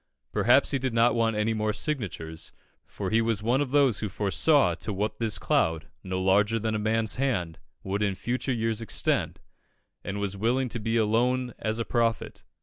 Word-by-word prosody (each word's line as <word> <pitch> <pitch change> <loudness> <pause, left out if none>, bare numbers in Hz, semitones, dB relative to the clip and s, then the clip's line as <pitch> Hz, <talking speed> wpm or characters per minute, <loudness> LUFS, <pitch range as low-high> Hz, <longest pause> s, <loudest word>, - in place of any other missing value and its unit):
Perhaps - - +3
he 135 - 0
did 130 -2 -2
not 115 +1 +4
want 115 -1 +1
any 105 +1 0
more 110 -1 -1
signatures, 85 - -4 0.3
for - - -5
he 115 +1 +3
was 115 -2 -1
one 125 +5 +2
of 145 - -1
those 135 -5 +3
who 105 - -3
foresaw 110 +10 +2
to 110 - -5
what 105 +2 -3
this 110 -5 +1
cloud, 80 -3 0
no 95 0 -3
larger 100 +4 +3
than 110 0 -2
a 110 - -1
man's 110 +1 0
hand, 95 -12 -1 0.2
would 100 +2 -2
in 100 -2 0
future 125 +6 -2
years 115 -2 -1
extend, 115 - -1 0.6
and 100 +1 -4
was 100 -1 -2
willing 120 +5 0
to 120 - -3
be 115 +2 -1
alone 120 +3 +1
as 110 0 -1
a 115 - -2
prophet. 115 -2 -1
110 Hz, 190 wpm, -27 LUFS, 100-120 Hz, 0.6 s, not